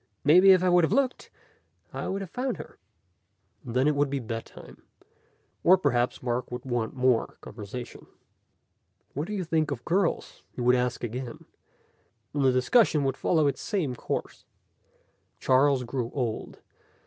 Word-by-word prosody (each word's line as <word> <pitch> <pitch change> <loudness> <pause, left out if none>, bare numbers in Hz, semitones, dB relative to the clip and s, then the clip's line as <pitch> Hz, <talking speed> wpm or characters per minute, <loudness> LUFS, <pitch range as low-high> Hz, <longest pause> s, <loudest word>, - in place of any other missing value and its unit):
"Maybe 180 +7 +6
if 185 -1 +5
I 185 - +3
would 175 -1 +5
have 160 - +1
looked, 265 -2 0 0.6
I - - -4
would 195 +1 -3
have 190 - -7
found 255 +1 -2
her." - - -11 0.8
And 120 -3 -7
then 130 +3 +3
it 150 - +3
would 145 0 +1
be 140 - -2
bedtime. 115 -2 -8 0.8
Or 185 +2 +7
perhaps 125 -9 0
Mark 125 0 -2
would 125 +1 -6
want 120 -2 -2
more 130 -2 +1
conversation. 110 +3 -9 1.1
"What 150 +5 -3
do 210 - -5
you 195 -3 -2
think 160 -2 0
of 135 -5 -5
girls?" 180 0 -1
he - - -9
would 125 +1 +4
ask 125 0 -1
again, 120 +1 -6 0.9
and 145 -1 0
the 130 - +5
discussion 150 - +3
would 135 -1 0
follow 160 0 +1
its 140 -2 -1
same 175 - -2
course. - - -5 1.0
Charles 135 0 +3
grew 120 -1 -3
old. 120 -5 -3
135 Hz, 160 wpm, -27 LUFS, 125-170 Hz, 1.1 s, Or